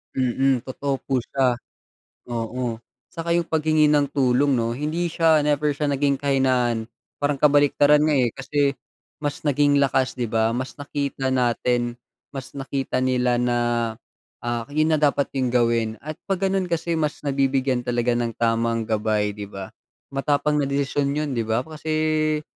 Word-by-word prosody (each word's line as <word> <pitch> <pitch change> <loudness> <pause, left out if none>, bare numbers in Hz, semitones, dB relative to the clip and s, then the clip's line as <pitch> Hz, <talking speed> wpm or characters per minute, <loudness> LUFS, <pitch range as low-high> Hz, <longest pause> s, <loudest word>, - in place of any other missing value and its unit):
mm, 130 0 +2
totoo 135 +1 -2
po 130 -3 0
siya. 130 -3 +1 0.7
Oo, 120 0 -3 0.3
saka 170 -1 -5
yung 170 -1 +1
paghingi 155 -1 +2
ng 145 -2 +2
tulong 135 +1 +3
'no 115 0 0
hindi 155 +6 -2
siya 160 -1 +4
never 150 0 +1
siya 145 0 -1
naging 140 0 +1
kahinaan 130 -5 +1 0.4
parang 145 0 +2
kabaliktaran 145 0 +5
nga, 155 -1 +3
eh, 120 -2 +2
kasi 140 +1 0 0.5
mas 145 -1 -3
naging 145 0 +3
lakas 130 -1 +1
di 120 - 0
ba, 110 0 +1
mas 130 +3 -4
nakita 140 -2 -3
natin, 120 -1 +1 0.4
mas 130 -2 -6
nakita 135 -1 -3
nila 125 -1 +1
na, 120 0 +1 0.8
ah, 120 -1 -2
yun 155 +2 +1
na 155 - +3
dapat 145 -1 +1
yung 130 - +1
gawin 115 -2 +2
at 155 +1 -7
pag 195 -1 -2
ganun 190 -1 0
kasi 170 -1 -1
mas 150 -1 -2
nabibigyan 135 -3 0
talaga 120 0 +1
ng 115 -2 -2
tamang 115 0 0
gabay 105 -1 0
di 105 0 -7
ba, 100 -1 -8 0.4
matapang 145 +2 +1
na 145 - +1
desisyon 140 0 0
yun 150 -1 -2
di 115 -3 -2
ba, 115 +3 +1
kasi, 155 0 -1
135 Hz, 155 wpm, -23 LUFS, 120-150 Hz, 0.8 s, kabaliktaran